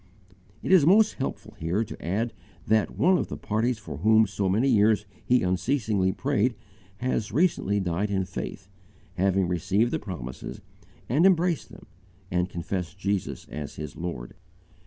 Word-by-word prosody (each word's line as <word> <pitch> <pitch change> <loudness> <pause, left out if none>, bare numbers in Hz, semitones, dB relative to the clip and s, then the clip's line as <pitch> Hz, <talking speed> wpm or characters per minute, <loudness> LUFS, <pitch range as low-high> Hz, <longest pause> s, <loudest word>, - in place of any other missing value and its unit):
It - - -1
is 185 -5 +7
most 210 +7 +5
helpful 135 - -4
here 85 +7 0
to - - -9
add 105 +7 -1 0.3
that 110 0 +1
one 180 +5 +4
of - - -2
the - - -6
parties 115 +3 0
for 80 -10 -8
whom 110 +6 +5
for 100 - -9
so 100 -1 0
many 110 +8 +2
years 105 -3 +4 0.2
he 125 0 +3
unceasingly 100 0 +1
prayed 125 -1 0 0.4
has 115 -2 -1
recently 120 - +2
died 95 +2 -1
in 95 -2 0
faith, 90 0 -6 0.5
having 95 0 +2
received 95 +7 +1
the - - 0
promises 65 - -7 0.5
and 140 +8 +2
embraced 180 -3 +3
them - - -13 0.5
and 90 0 +1
confessed 90 0 -4
Jesus 100 -1 -2
as 75 -2 -6
his 75 -1 -7
Lord. 85 -9 -5
100 Hz, 155 wpm, -26 LUFS, 90-125 Hz, 0.5 s, is